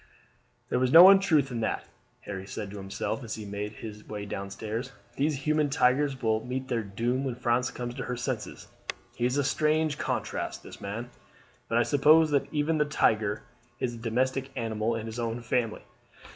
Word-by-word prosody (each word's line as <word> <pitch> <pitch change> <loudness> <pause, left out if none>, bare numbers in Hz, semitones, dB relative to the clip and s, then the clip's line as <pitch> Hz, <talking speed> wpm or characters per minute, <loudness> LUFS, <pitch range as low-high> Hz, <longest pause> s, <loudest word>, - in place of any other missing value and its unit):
"There - - +1
was 130 0 +2
no 175 +5 +11
untruth 165 -9 +4
in 120 - -2
that," 110 - -1 0.4
Harry 95 -1 -6
said 100 0 -5
to 105 - -7
himself 100 +6 -3
as 110 - -4
he 110 - -7
made 100 +1 -4
his 105 -1 -9
way 105 -1 -5
down 100 -1 -5
stairs. 110 +6 -5 0.2
"These 140 -1 0
human 155 -1 +2
tigers 135 -1 +2
will 110 -1 +1
meet 130 +1 -4
their 115 -2 +1
doom 115 +6 -1
when 130 -3 -2
France 125 0 +1
comes 120 -1 -5
to 130 +1 -5
her 125 - -3
senses. 120 - -4 0.5
He 120 - 0
is 125 +3 -1
a 145 - +2
strange 155 +1 +1
contrast, - - -3
this - - -11
man; 115 +5 -5 0.6
but 115 - +2
I 120 - +5
suppose 155 +4 +5
that 140 -2 +1
even 155 +1 +1
the 150 - +4
tiger 110 -7 +1 0.4
is 120 -2 -1
a - - -8
domestic 130 +4 -1
animal 115 -2 -1
in 110 -1 -4
his 115 +1 -6
own 115 0 -2
family. 115 -1 -1
120 Hz, 190 wpm, -28 LUFS, 110-140 Hz, 0.6 s, no